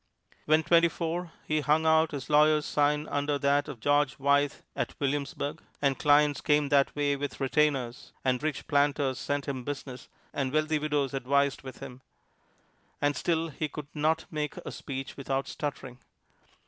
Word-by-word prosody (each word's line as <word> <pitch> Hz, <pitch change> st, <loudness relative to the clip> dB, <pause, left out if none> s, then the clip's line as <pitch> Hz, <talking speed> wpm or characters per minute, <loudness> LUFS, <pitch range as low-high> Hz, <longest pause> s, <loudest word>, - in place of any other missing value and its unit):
When 155 Hz, +1 st, +4 dB
twenty 170 Hz, +2 st, +5 dB
four, 170 Hz, +1 st, -3 dB
he 155 Hz, 0 st, +1 dB
hung 155 Hz, +2 st, +2 dB
out 160 Hz, 0 st, +4 dB
his 140 Hz, -4 st, -6 dB
lawyer's 150 Hz, 0 st, +4 dB
sign 150 Hz, +1 st, +1 dB
under 145 Hz, 0 st, 0 dB
that 140 Hz, +1 st, +2 dB
of 140 Hz, -6 st, -7 dB
George 145 Hz, +2 st, +2 dB
Wythe 140 Hz, 0 st, +2 dB, 0.2 s
at -, -, -4 dB
Williamsburg. 140 Hz, 0 st, -2 dB, 0.2 s
And 140 Hz, -2 st, +1 dB
clients 145 Hz, -1 st, +4 dB
came 150 Hz, -1 st, +2 dB
that 140 Hz, -1 st, +3 dB
way 145 Hz, -1 st, +1 dB
with 145 Hz, 0 st, -5 dB
retainers, 135 Hz, -3 st, 0 dB
and 125 Hz, -1 st, +1 dB
rich 155 Hz, -1 st, -2 dB
planters 140 Hz, -2 st, +1 dB
sent 145 Hz, -1 st, -2 dB
him 130 Hz, -3 st, -3 dB
business, 135 Hz, -2 st, -6 dB, 0.2 s
and 135 Hz, -2 st, -1 dB
wealthy 155 Hz, +1 st, +1 dB
widows 145 Hz, -3 st, -1 dB
advised 140 Hz, +1 st, +1 dB
with 130 Hz, -2 st, -10 dB
him 125 Hz, +1 st, -9 dB, 1.0 s
and 145 Hz, 0 st, +1 dB
still 165 Hz, +3 st, 0 dB
he 155 Hz, +1 st, -3 dB
could 150 Hz, -1 st, -8 dB
not 160 Hz, +2 st, +1 dB
make 150 Hz, -2 st, -3 dB
a -, -, -5 dB
speech 135 Hz, -1 st, -6 dB
without 135 Hz, 0 st, -2 dB
stuttering. 135 Hz, -4 st, -5 dB
145 Hz, 160 wpm, -29 LUFS, 140-150 Hz, 1.0 s, twenty